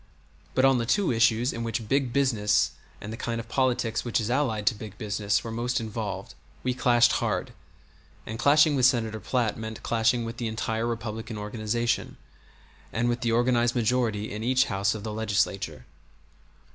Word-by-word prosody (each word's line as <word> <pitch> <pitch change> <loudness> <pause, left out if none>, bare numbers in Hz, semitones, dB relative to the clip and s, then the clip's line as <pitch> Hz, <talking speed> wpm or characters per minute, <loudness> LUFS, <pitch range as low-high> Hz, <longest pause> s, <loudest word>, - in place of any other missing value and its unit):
But 130 - +4
on 135 -2 +4
the 115 - -2
two 200 - +2
issues 115 +1 +3
in 115 - -4
which 115 -1 -3
"big 135 0 +1
business" 115 -6 +2 0.3
and 105 +2 -7
the - - -6
kind 115 -1 -3
of 115 - -7
politics 125 -2 0
which 120 - 0
is 110 +1 -2
allied 120 -6 0
to 110 - +4
big 105 -1 -9
business 105 -1 -1
were 115 - -5
most 120 +3 -1
involved 110 -2 -5 0.3
we 125 - 0
clashed 120 -1 +4
hard 115 +2 -1 0.7
and 110 0 -6
clashing 150 +2 +5
with 130 -2 +5
Senator 115 -4 0
Platt 115 +1 -1
meant 110 0 -6
clashing 115 +1 +1
with 115 0 -6
the 120 - -2
entire 110 +1 -2
Republican 115 -1 -4
organization, 110 +3 -2 0.7
and 120 +2 0
with 120 0 -1
the 120 -2 +1
organized 120 0 +2
majority 115 -3 0
in 105 +1 -5
each 130 +2 +3
house 100 +1 0
of 105 - -7
the 110 -1 -4
Legislature. 100 -6 -1
115 Hz, 175 wpm, -27 LUFS, 110-125 Hz, 0.7 s, clashing